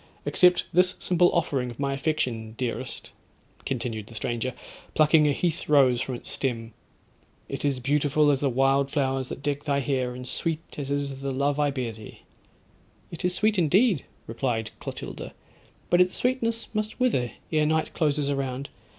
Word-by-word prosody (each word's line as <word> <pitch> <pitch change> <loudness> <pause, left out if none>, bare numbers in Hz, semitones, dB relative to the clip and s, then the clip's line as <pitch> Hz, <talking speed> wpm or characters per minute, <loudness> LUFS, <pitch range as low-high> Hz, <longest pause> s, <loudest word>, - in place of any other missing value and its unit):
Accept 180 -1 +4
this 180 +1 +4
simple 175 0 +3
offering 140 -7 0
of 120 - -10
my 140 -1 0
affection, 125 -6 -2
dearest,' 125 -2 -4 0.6
continued 115 -5 -3
the 115 - -12
stranger, 120 +3 -2 0.4
plucking 155 0 +5
a - - +4
heath 165 +2 -1
rose 130 -5 +5
from 130 -1 -3
its - - -9
stem; 115 -4 -3 0.7
'it - - -5
is 140 -3 +1
beautiful 145 +2 +3
as 135 - +1
the 140 - +2
wild 135 +2 +2
flowers 135 -3 0
that - - -7
deck 145 0 -2
thy 140 -2 +1
hair, 130 -2 -1
and 125 0 -7
sweet 165 +1 -3
as 140 -1 -4
is 140 -1 -2
the 140 - -2
love 140 +2 0
I 145 -1 +3
bear 130 -4 -2
thee.'—'It 110 +8 -15
is 180 0 +1
sweet, 215 0 +2
indeed,' 180 - +3 0.2
replied 115 -2 -2
Clotilda, - - -7 0.6
'but 175 - +6
its 180 0 +2
sweetness 230 -2 0
must 215 0 -2
wither 130 - +1 0.2
ere 155 -1 +3
night 160 0 0
closes 150 -2 +1
around. 135 -1 -3
140 Hz, 165 wpm, -26 LUFS, 130-160 Hz, 0.7 s, but